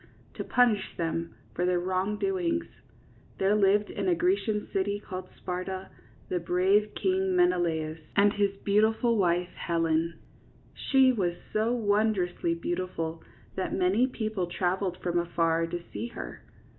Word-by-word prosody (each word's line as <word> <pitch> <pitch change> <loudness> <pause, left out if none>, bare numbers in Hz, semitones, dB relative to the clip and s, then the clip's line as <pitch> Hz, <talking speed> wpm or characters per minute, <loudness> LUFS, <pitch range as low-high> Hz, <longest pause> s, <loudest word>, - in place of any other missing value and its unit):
to - - -5
punish 245 -5 +2
them 165 0 -2 0.2
for 175 - -2
their 180 0 +2
wrongdoings, 270 - 0 0.7
there 195 +2 +2
lived 205 0 +3
in - - -3
a 360 - +4
Grecian 335 - 0
city 200 +1 0
called 185 -2 -7
Sparta, 185 +1 -5 0.4
the 180 - -1
brave 190 +5 +2
king 380 0 +1
Menelaus 165 - +1 0.2
and 205 0 +5
his 205 -1 +2 0.2
beautiful 220 +3 +3
wife, 180 -3 +1
Helen. 165 -1 0
^ - - -27 0.5
She 265 -1 +4
was 185 -8 0 0.2
so 220 +2 +2
wondrously 205 -6 +1
beautiful 170 -2 -3 0.3
that 190 - -2
many 195 +7 +3
people 215 -7 -2
traveled 180 +1 -1
from 175 -1 +1
afar 165 -1 +1
to 175 +1 -5
see 235 - -3
her. 235 - -8
190 Hz, 135 wpm, -28 LUFS, 175-220 Hz, 0.7 s, and